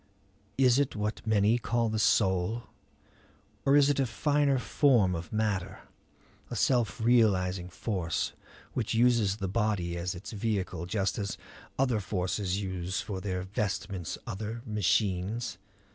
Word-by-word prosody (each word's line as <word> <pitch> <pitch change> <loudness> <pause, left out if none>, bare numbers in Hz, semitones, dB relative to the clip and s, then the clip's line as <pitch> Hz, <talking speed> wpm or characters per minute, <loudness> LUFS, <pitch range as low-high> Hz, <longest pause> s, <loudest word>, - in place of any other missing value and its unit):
Is 130 -1 +5
it 145 -1 0
what 105 +1 -2
many 110 +2 +3
call 115 0 0
the 110 0 -1
soul? 95 +2 +2 1.0
Or 135 - +6
is 145 -1 +6
it 145 -1 +1
a 135 - +2
finer 145 +2 +2
form 125 -7 +3
of 85 -1 -5
matter, 105 -4 -1 0.7
a - - -5
self 120 -8 +1
realizing 95 -6 +2
force, 90 -3 -2 0.4
which 115 -2 -1
uses 115 -4 +3
the 95 -2 -3
body 100 -4 0
as 85 +1 -3
its 85 - -8
vehicle 100 -6 -2
just 100 +1 -1
as 100 -1 -3 0.4
other 125 -4 +2
forces 95 0 -1
use 95 -2 -3
for 95 -3 -4
their 90 -2 -2
vestments 95 -3 -3
other 110 +4 -5
machines? 105 +1 0
105 Hz, 135 wpm, -29 LUFS, 95-115 Hz, 1.0 s, Or